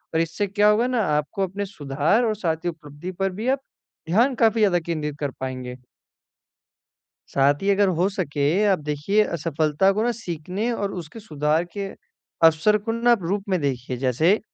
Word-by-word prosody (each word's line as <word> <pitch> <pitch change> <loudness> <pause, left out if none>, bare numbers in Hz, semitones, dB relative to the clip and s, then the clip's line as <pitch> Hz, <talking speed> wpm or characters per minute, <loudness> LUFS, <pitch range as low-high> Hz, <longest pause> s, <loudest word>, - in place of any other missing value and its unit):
और - - +3
इससे 165 +5 -2
क्या 205 +2 +3
होगा 225 +4 +3
ना 250 -3 +1 0.2
आपको 195 +7 -2
अपने 200 +3 -4
सुधार 155 - 0
और 215 -2 0
साथ 165 -6 0
ही - - +2
उपलब्धि 160 +2 -8
पर 195 0 +1
भी 230 - -3
आप 270 - +2 0.5
ध्यान 240 +9 +3
काफ़ी 225 -1 +3
ज़्यादा 190 -4 +4
केंद्रित 155 -3 -3
कर 145 -2 -2
पाएँगे। 130 -1 -5 1.6
साथ 140 +1 +4
ही 195 - 0
अगर 200 0 +4
हो 185 - +3
सके 155 -8 -3 0.3
आप 190 - +1
देखिए 150 +8 +1
असफलता 155 +3 +1
को 215 +2 0
ना 240 - +2
सीखने 190 +1 -4
और 205 -4 -2
उसके 165 +8 -11
सुधार 155 -4 0
के 200 -1 -3 0.6
अवसर 165 +7 +5
को 215 +2 -4
ना 235 +1 +2
आप 210 -7 +2
रूप 195 +4 -1
में 185 - +1
देखिए 130 -2 -2
जैसे, 135 - +2
180 Hz, 180 wpm, -23 LUFS, 150-210 Hz, 1.6 s, अवसर